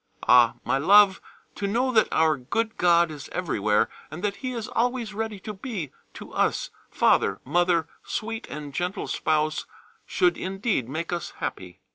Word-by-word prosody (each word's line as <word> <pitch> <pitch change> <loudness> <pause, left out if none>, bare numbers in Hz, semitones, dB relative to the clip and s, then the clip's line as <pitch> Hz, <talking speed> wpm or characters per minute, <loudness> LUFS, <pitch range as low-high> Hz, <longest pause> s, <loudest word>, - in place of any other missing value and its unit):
Ah! 120 -1 +6
my 135 - +1
love, 195 +4 +6 0.3
to 200 - -3
know 245 +6 +1
that 220 -3 +4
our 160 -1 +3
good 220 - -2
God 170 -2 +4
is 145 -3 -9
everywhere, 110 - +1 0.2
and 165 +3 -8
that 205 -1 -1
He 255 -1 -4
is 230 -3 -4
always 240 -2 -1
ready 220 -1 -4
to 215 - -6
be 190 - -5 0.2
to - - -10
us, - - 0 0.2
Father, - - +2
Mother, 170 +2 +2 0.2
sweet 225 +1 -4
and 150 -2 -7
gentle 180 +5 -2
Spouse, 155 0 0 0.4
should 360 -1 +2
indeed 190 - -2
make 160 +5 -3
us 175 - -4
happy. 90 -1 -6
180 Hz, 160 wpm, -25 LUFS, 150-220 Hz, 0.4 s, Ah